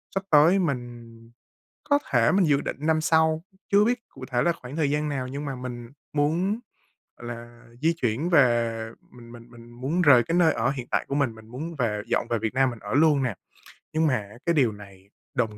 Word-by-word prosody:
sắp 195 - -1
tới 160 +6 +6
mình 120 -7 -3 0.7
có 285 -1 +3
thể 115 -2 +4
mình 190 -3 +3
dự 145 -2 +3
định - - -4
năm 155 +1 +1
sau, 160 0 +2 0.3
chưa 205 +1 +6
biết 245 +1 0
cụ - - -11
thể 120 -1 +1
là 170 - +2
khoảng 135 -2 -10
thời 145 -3 +1
gian 150 +1 0
nào 130 -3 -3
nhưng 140 +3 -5
mà 135 -3 -4
mình 120 -2 -7 0.2
muốn 170 +9 0 0.6
là 120 0 -9 0.2
di 165 +2 +3
chuyển 140 +2 -1
về, 120 -7 +2 0.2
mình 120 -1 -14
mình 120 0 -13
mình 120 0 -14
muốn 135 +9 -2
rời 130 -7 +6
cái 165 +8 -1
nơi 165 -3 +4
ở 120 +4 0
hiện 130 -3 -6
tại - - +1
của 140 - -2
mình, 130 -6 0
mình 110 0 -15
muốn 155 +8 -6
về 110 -6 -1
dọn - - 0
về 115 - 0
Việt 110 0 -2
Nam 130 0 +3
mình 120 -3 -8
ở 105 +3 -6
luôn 145 -2 +4
nè. 120 -6 -1 0.6
Nhưng 160 0 +2
mà 140 - +2
á, 105 0 -6
cái 170 - +2
điều 125 -7 +3
này 100 -2 -14 0.2
đồng 115 -6 -1
130 Hz, 220 wpm, -25 LUFS, 120-160 Hz, 0.7 s, tới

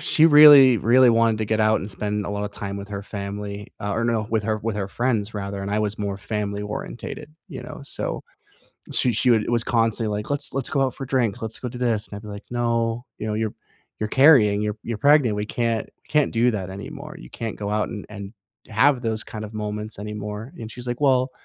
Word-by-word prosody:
she 160 - +4
really, 145 -5 +9
really 120 +3 +5
wanted 115 -1 +3
to 110 - -1
get 110 +1 0
out 110 0 +3
and 100 - -6
spend 105 0 -3
a - - -4
lot 100 0 -2
of 105 - -4
time 100 -1 -6
with 100 0 -7
her 100 -1 -5
family, 100 0 -6
ah, 100 0 -2
or 115 - 0
no, 115 -2 0
with 110 -2 +1
her 110 0 -1
with 110 0 -3
her 100 -2 -3
friends 115 -1 -1
rather, 100 -1 -4
and 100 - -4
I 105 - +1
was 105 -1 -2
more 100 -1 -2
family 105 -1 -3
orientated, 135 +8 -7
you 135 -6 -7
know, 125 - -9
so, 140 - -4 0.7
she 125 - +2
she 125 - +3
would 110 -2 +4
it - - -4
was 120 -1 +2
constantly 115 -2 0
like, 105 - -6
"Let's 145 -1 -2
let's 135 -1 -2
go 140 - 0
out 130 -2 -1
for 135 - -6
drink. 125 -4 0
Let's 110 -1 -4
go 125 - -4
do 125 - -8
this." 115 -4 0
And - - -9
I'd 100 - -7
be 105 - -11
like, 100 0 -8
"No, 115 -1 0
you - - -5
know, 105 - -1
you're 110 -1 -2 0.5
you're 110 - -1
carrying, 125 -8 +5
you're 105 0 -2
you're 115 -2 -4
pregnant. 140 -7 +4
We 105 - -2
can't 115 0 -1 0.2
can't 150 -2 +2
do 120 +2 +3
that 95 -4 -4
anymore. 95 +1 -8
You - - -12
can't 115 -2 -5
go 100 -1 -4
out 105 0 0
and 105 -3 -7
and 100 -2 -8 0.4
have 125 +4 +3
those 110 -2 -2
kind 110 -1 -7
of 105 - -11
moments 105 0 -4
anymore." 105 +3 -6
And 110 - -7
she's 125 0 -8
like, 120 +3 -3
"Well, 130 -2 +3
110 Hz, 240 wpm, -23 LUFS, 105-120 Hz, 0.7 s, really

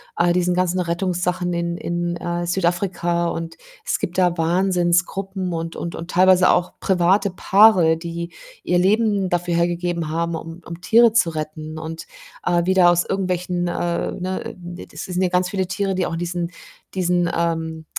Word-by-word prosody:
all 175 0 +2
diesen 180 0 +1
ganzen 185 0 +1
Rettungssachen 180 0 -1
in 170 0 -2
in, 175 0 -2
äh, 175 0 -3
Südafrika 175 -1 0
und 165 -1 -5 0.3
es - - 0
gibt 175 - -4
da 180 -2 +3
Wahnsinnsgruppen 185 +2 0
und 165 0 -4
und 170 - -5
und 170 +1 -7
teilweise 185 0 +5
auch 180 0 +1
private 190 +2 +2
Paare, 190 -3 +5
die 170 +1 -6 0.3
ihr 175 0 +2
Leben 205 0 +2
dafür 175 0 -1
hergegeben 170 -1 -1
haben, 170 +1 -1
um 165 +1 -7
um 170 +1 -8
Tiere 230 +3 +5
zu 225 -7 +3
retten 155 0 -6
und, 160 +1 -7 0.4
äh, 175 -1 +1
wieder 185 -1 +5
aus 175 0 +2
irgendwelchen, 180 -2 -1
äh, 175 0 -2
ne 185 +1 -4
d 175 0 -9
das - - -8
sind 180 0 -2
ja 185 - +2
ganz 180 0 +1
viele 190 -3 -1
Tiere, 195 +1 -1
die 185 -1 0
auch - - -5
in 165 - -3
diesen 175 0 -3 0.5
diesen, 175 -1 +1
ähm 160 -1 -2
175 Hz, 170 wpm, -21 LUFS, 170-185 Hz, 0.5 s, teilweise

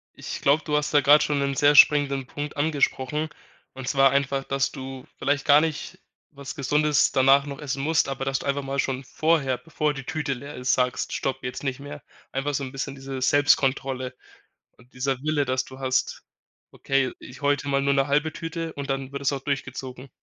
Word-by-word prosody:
Ich - - -6
glaube, 145 +3 +3
du 150 -1 0
hast 150 0 -1
da 145 - +6
grade 145 +2 +6
schon 145 -1 0
'nen 140 0 0
sehr 145 +2 +4
springenden 140 -3 +5
Punkt 145 +3 -6
angesprochen, 150 0 0 0.5
und 130 -1 -7
zwar 135 -1 +5
einfach, 140 0 0
dass 135 0 -1
du 130 -2 -8
vielleicht 145 0 0
gar 145 +1 +6
nicht 160 -2 -3 0.3
was 140 0 -8
Gesundes 150 +1 +2
danach 135 +1 +5
noch 140 +1 -7
essen 135 -1 -3
musst, 160 -1 +2
aber 135 0 -3
dass 135 0 -1
du - - -8
einfach 140 0 0
mal 135 0 -4
schon 135 0 -3
vorher, 150 -4 +1
bevor 150 +2 -2
die 135 - -6
Tüte 155 -3 -2
leer 140 +3 -7
ist, 125 0 0
sagst: 125 0 -1
„Stopp, 135 0 -2
jetzt 125 - -5
nicht 135 -2 -2
mehr.“ 145 +1 -9 0.3
Einfach 135 +2 -2
so 140 - -1
'n 130 - -8
bisschen 135 0 -4
diese 135 -1 -6
Selbstkontrolle 135 -2 +2 0.6
und 125 0 -22
dieser 130 0 -2
Wille, 150 -1 +1
dass 130 0 -1
du 130 0 -12
hast: 130 0 -1 0.5
„Okay, 135 -2 0
ich 130 +4 -12
heute 145 0 +1
mal 140 0 +1
nur 140 0 +2
'ne 135 0 +2
halbe 150 +2 +1
Tüte“, 165 0 -5
und 140 -1 -6
dann 135 0 -3
wird 140 - -4
das 140 +1 +1
auch 135 - -4
durchgezogen. 135 -2 -5
140 Hz, 205 wpm, -25 LUFS, 135-145 Hz, 0.6 s, da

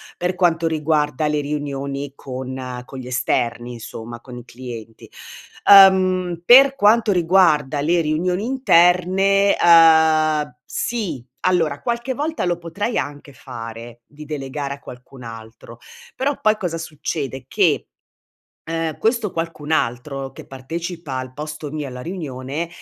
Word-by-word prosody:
per 180 +1 -2
quanto 170 -2 +2
riguarda 150 -2 0
le 150 0 0
riunioni 140 -1 -4
con 130 -1 -6
con 135 - -10
gli 125 - -8
esterni, 120 -1 -1
insomma, 115 0 -8
con 125 -2 -11
i 120 - -10
clienti. 115 -3 -10 0.6
Ehm, 185 -3 +6
per 270 +4 +8
quanto 220 -2 +4
riguarda 165 -5 +3
le 170 +3 +2
riunioni 180 +6 -1
interne, 195 -4 +3
ehm, 160 -4 +5
sì. 180 - -3 0.2
Allora, 165 -6 +1
qualche 240 +2 -2
volta, 300 +1 -2
lo 175 -1 0
potrei 200 +7 -3
anche 145 0 -5
fare, 115 -2 -9
di 150 +1 -13
delegare 140 -1 -5
a - - -19
qualcun 125 0 -13
altro, 115 -1 -11 0.4
però, 275 +2 -1
poi, 215 0 +3
cosa 175 -5 -3
succede? 145 -4 -5
Che, - - +1 0.8
ehm, 165 -1 -3
questo 225 -3 0
qualcun 165 -2 -5
altro, 135 0 -2
che - - -12
partecipa 160 +2 -6
al 130 0 -6
posto 150 +1 -7
mio, 150 -1 -4
alla 125 -1 -8
riunione, 155 -2 -5
155 Hz, 130 wpm, -20 LUFS, 130-180 Hz, 0.8 s, per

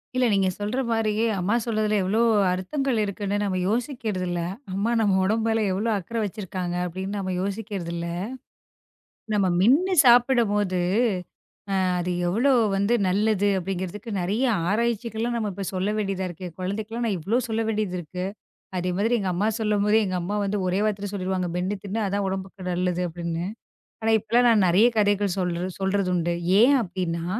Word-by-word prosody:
இல்ல 255 0 +3
நீங்கச் 190 -2 +1
சொல்ற 210 +6 -1
மாரி, 225 -2 +1 0.2
அம்மா 190 +5 +1
சொல்றதுல 215 -2 0
எவ்ளோ 200 +4 +1 0.3
அர்த்தங்கள் 245 +8 -1
இருக்குன்னு 205 0 -2
நம்ம 195 -2 -1
யோசிக்கிறது 225 -5 -2
இல்ல. 175 -1 -1 0.3
அம்மா 200 +5 0
நம்ம 205 -3 +3
உடம்புல 225 +3 +1
எவ்ளோ 210 +5 -1
அக்கறை 225 +5 -4
வச்சிருக்காங்க 185 -3 -4
அப்படின்னு 190 +3 -4
நாம 190 -1 -2
யோசிக்கிறது 200 -3 -4
இல்ல. 170 0 -3 1.3
நம்ம 205 -2 +2
மென்னு 300 - +4
சாப்பிடம்போது 235 -6 +4 1.0
அ - - +1
அது 180 +1 -1 0.2
எவ்வளோ 235 +10 +3 0.2
வந்து 200 +4 +2
நல்லது 205 +1 +2
அப்படிங்கறதுக்கு 190 +4 -4
நிறைய 205 +9 0 0.3
ஆராய்ச்சிகள்லாம் 230 +1 -1
நம்ம 215 -3 -1
இப்ப 195 +2 -5
சொல்லவேண்டியதா 195 0 -1
இருக்கு. 180 +1 -8
குழந்தைகளுக்குலாம் 215 +5 -3
நான் 205 -4 0
எவ்வளோ 210 +10 +1
சொல்லவேண்டியது 220 -3 -1
இருக்கு. 180 +2 -5 0.5
அதே 180 0 -1
மாதிரி 230 +4 +2
எங்க 195 -2 -1
அம்மா 200 +5 +1
சொல்லும்போது 210 0 +2
எங்க 185 -1 -2
அம்மா 200 +4 -2
வந்து 200 +1 -1
ஒரே 185 +2 +1
வார்த்தையில 205 -2 -2
சொல்லிருவாங்க. 185 -2 -2
"மென்னு 185 +3 -1
தின்னு. 205 +3 -3
அதான் 200 +1 -1
உடம்புக்கு 190 0 -6
நல்லது." 180 0 0
அப்படின்னு. 170 0 -4 0.6
ஆனா 225 - +2
இப்ப 235 +4 +2
நான் 215 -4 +4
நிறைய 190 +7 +5
கதைகள் 205 -2 +2
சொல்ற 180 0 -1
சொல்றதுண்டு. 180 -3 0 0.3
ஏன் 270 +4 +6
அப்படின்னா 170 -3 -3
200 Hz, 150 wpm, -25 LUFS, 185-220 Hz, 1.3 s, ஏன்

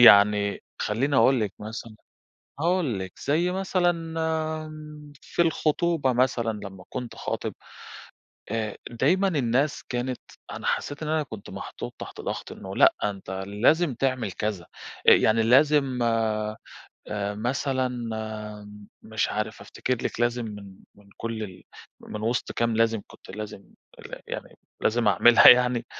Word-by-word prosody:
يعني 100 -2 +7 0.2
خلِّيني 130 +6 0
أقول 125 +2 +5
لِك 105 -3 -1
مثلًا، 110 +1 -7 0.7
هاقول 165 - +1
لِك 95 -1 -6
زي 165 +5 +2
مثلًا 185 -2 +2 1.3
في 175 - 0
الخُطوبة، 160 -3 +1
مثلًا 120 -2 +1
لمَّا 95 -2 -9
كنت 125 -2 -5
خاطِب، - - -3 1.0
آآ، 110 -2 -2
دايمًا 175 +12 +2
الناس 140 -3 +1
كانت 125 0 -2 0.3
أنا - - -7
حسِّيت 145 +2 -2
إن 155 - -3
أنا 155 -1 +1
كنت 110 -7 -10
محطوط - - -7
تحت - - -8
ضغط - - -4
إنه - - -8
"لأ، - - +6
أنتَ 100 -2 -3 0.2
لازم 135 +10 +3
تعمل 130 -5 -1
كذا." 100 -2 -3 0.5
آآ - - +10
يعني 110 +1 +4
لازم 135 +1 +4
آآ، 110 -2 0 0.8
مثلًا 130 +3 0 1.1
مش 110 0 -1
عارف 110 +1 -3
أفتكر 130 - -2
لِك، - - -6
لازم 120 0 +1
من 100 -3 -9 0.2
من 100 0 -21
كل 115 -1 -4
ال 95 -4 -8 0.4
من 105 0 -7
وسط 120 +2 -1
كام 115 -1 0
لازم 115 -1 +2
كنت - - -14
لازم 105 0 -7 0.6
يعني، - - -7 0.2
لازِم 115 0 +2
أعملها 115 +3 +8
يعني. 125 -1 +6
120 Hz, 130 wpm, -26 LUFS, 105-135 Hz, 1.3 s, آآ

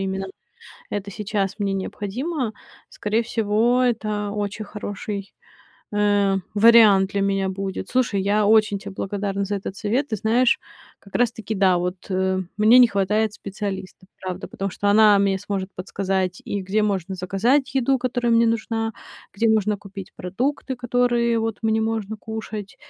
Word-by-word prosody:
именно 195 0 -2 0.6
это 205 -1 -4
сейчас 200 -2 -2
мне 200 -1 0
необходимо. 225 - -3 0.4
Скорее 220 +3 -1
всего, 230 +2 +1
это 215 -4 0
очень 210 +1 -3
хороший, 205 -1 -6 0.6
э, 205 -1 +3 0.2
вариант 205 -3 +6
для 200 - 0
меня 195 -1 +1
будет. 190 0 -4
Слушай, 245 -6 +1
я 205 +1 +2
очень 215 -2 +4
те 200 - -8
благодарна 200 0 -3
за 205 +1 -2
этот 195 0 -5
совет. 250 +7 0
Ты 220 - -2
знаешь, 230 +4 +2 0.4
как 200 - -15
раз 245 -1 +3
таки 220 -1 -5
да, 190 -3 +3
вот, 180 +1 -2
э, 190 0 0 0.2
мне 220 +4 +7
не 245 - +8
хватает 210 +1 0
специалиста, 195 -2 -6
правда, 185 0 -5
потому 195 -1 -4
что 205 - -2
она 210 -1 +6
мне 195 -1 +2
сможет 195 -1 -4
подсказать 185 -1 -2
и 200 -1 -3
где 200 +3 0
можно 195 -3 -1
заказать 210 +10 +1
еду, 265 0 +2
которая 245 -1 0
мне 230 0 +5
нужна, 225 0 -1 0.4
где 225 +3 +2
нужно 215 -1 +2
купить 195 -1 -10
продукты, 255 +8 -2
которые, 240 -1 +1
вот, 225 -2 -2
мне 220 0 +1
можно 220 -1 -2
кушать, 215 -2 -6
205 Hz, 155 wpm, -23 LUFS, 195-225 Hz, 0.6 s, не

